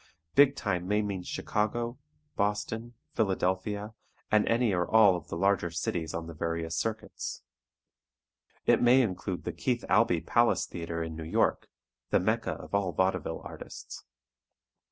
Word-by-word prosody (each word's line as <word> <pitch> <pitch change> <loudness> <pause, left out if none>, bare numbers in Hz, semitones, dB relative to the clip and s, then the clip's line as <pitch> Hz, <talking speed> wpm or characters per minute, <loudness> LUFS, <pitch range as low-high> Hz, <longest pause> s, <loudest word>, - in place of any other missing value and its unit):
Big 140 0 +6
time 90 -7 -2
may 105 +2 +2
mean 100 -3 -3
Chicago, 115 +6 -2 0.4
Boston, 110 +3 -2 0.2
Philadelphia, 100 +1 0 0.4
and 105 -1 +4
any 115 -2 +2
or 90 -1 0
all 105 -5 +6
the 85 +1 -6
larger 95 -1 +2
cities 85 -1 -2
on 85 0 -3
the 85 - -8
various 80 0 -2
"circuits." 110 +6 -4 1.2
It - - +4
may 125 +2 +6
include 95 -3 -3
the - - -3
Keith 125 -3 -1
Albee 95 -4 +4
Palace 120 0 +2
Theatre 85 -1 -4
in 80 -1 -5
New 80 - -6
York, 80 - +1 0.4
the - - +4
Mecca 110 +4 0
of - - -11
all 100 -3 +1
vaudeville 95 0 0
artists. - - -9
100 Hz, 140 wpm, -29 LUFS, 85-110 Hz, 1.2 s, Big